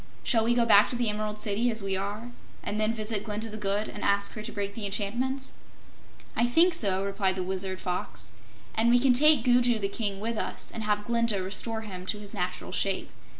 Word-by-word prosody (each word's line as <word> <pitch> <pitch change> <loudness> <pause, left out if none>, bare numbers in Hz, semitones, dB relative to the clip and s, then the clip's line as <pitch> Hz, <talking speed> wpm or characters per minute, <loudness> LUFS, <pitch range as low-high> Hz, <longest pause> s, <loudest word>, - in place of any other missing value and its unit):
"Shall 225 -3 +2
we 240 +1 +2
go 240 -1 +3
back 210 -2 +6
to - - -1
the 240 -2 0
Emerald 210 0 -3
City, 210 +3 +1
as 220 -3 0
we 195 -1 -1
are, 205 +5 -5 0.3
and 210 - -3
then 215 +1 +2
visit 215 -2 -1
Glinda 220 +1 -3
the 215 - -6
Good 205 +1 -1
and 205 - -7
ask 200 0 +2
her 215 - -6
to 220 +2 -6
break 200 -1 -4
the 215 -1 -5
enchantments?" 240 +7 -2 0.8
"I 240 - +2
think 335 +9 +4
so," 195 -9 +1
replied 195 -1 0
the 185 - -2
Wizard 190 0 -2
Fox. 180 -1 -5 0.4
"And 225 +2 +2
we 245 - +6
can 255 +1 +4
take 295 0 +6
Gugu 245 -1 +3
the 200 -2 -1
King 200 -2 -3
with 225 +1 -3
us, - - -5
and 225 - -5
have 210 0 0
Glinda 230 -4 +1
restore 220 +4 -1
him 185 -4 -8
to 210 - -1
his 210 0 -10
natural 180 -3 -4
shape. 195 -1 -1
215 Hz, 220 wpm, -27 LUFS, 200-235 Hz, 0.8 s, back